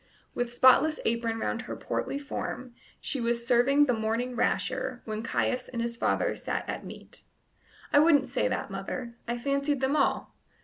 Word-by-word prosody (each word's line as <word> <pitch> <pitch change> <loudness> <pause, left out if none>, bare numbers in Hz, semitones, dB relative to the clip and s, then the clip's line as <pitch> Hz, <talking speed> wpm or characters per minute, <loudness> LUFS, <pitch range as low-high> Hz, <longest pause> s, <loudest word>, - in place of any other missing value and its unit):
With 245 -1 -2
spotless 260 +5 +5
apron 230 0 0
round - - -2
her - - -6
portly 275 - -3
form 260 -3 -5 0.3
she 270 - -2
was 235 0 0
serving 260 +4 +4
the 250 - +2
morning 230 +3 -1
rasher 245 +1 -1
while 215 -1 -3
Caius 250 +2 -1
and 240 - -5
his 235 0 -2
father - - +1
sat - - -3
at - - -4
meat. - - -10 0.7
"I 290 - +7
wouldn't 295 -3 +5
say 255 0 0
that, 255 -5 -3
mother: 235 +5 -5
I 240 +1 -1
fancied 280 +2 0
them 265 +2 +1
all." 280 - +1
250 Hz, 170 wpm, -28 LUFS, 235-275 Hz, 0.7 s, I